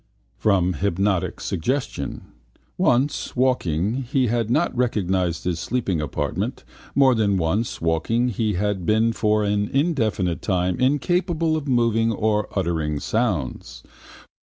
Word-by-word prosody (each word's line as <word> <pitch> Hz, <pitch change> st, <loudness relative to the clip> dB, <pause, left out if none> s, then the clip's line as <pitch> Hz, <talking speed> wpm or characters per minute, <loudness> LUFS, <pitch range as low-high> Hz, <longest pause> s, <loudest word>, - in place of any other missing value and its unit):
From 95 Hz, -4 st, +2 dB
hypnotic 95 Hz, +1 st, 0 dB
suggestion: 125 Hz, -, -3 dB, 0.5 s
once, 130 Hz, +5 st, +1 dB
waking, 125 Hz, -, 0 dB
he 135 Hz, -2 st, +3 dB
had 115 Hz, -1 st, 0 dB
not 150 Hz, +3 st, +1 dB
recognised 95 Hz, -8 st, 0 dB
his 90 Hz, -2 st, -1 dB
sleeping 95 Hz, -5 st, -1 dB
apartment: 75 Hz, -, -3 dB, 0.3 s
more 135 Hz, -2 st, +5 dB
than 105 Hz, -4 st, +1 dB
once, 95 Hz, +7 st, -1 dB
waking, 85 Hz, +10 st, +1 dB
he 110 Hz, -1 st, -1 dB
had 100 Hz, 0 st, -1 dB
been 110 Hz, +4 st, +2 dB
for 105 Hz, -1 st, +1 dB
an 105 Hz, 0 st, 0 dB
indefinite 115 Hz, -, 0 dB
time 90 Hz, -1 st, 0 dB
incapable 165 Hz, +4 st, +1 dB
of 150 Hz, -2 st, -3 dB
moving 115 Hz, -3 st, +2 dB
or 105 Hz, -1 st, 0 dB
uttering 80 Hz, -5 st, -1 dB
sounds. 75 Hz, -, -2 dB
105 Hz, 120 wpm, -23 LUFS, 90-125 Hz, 0.5 s, more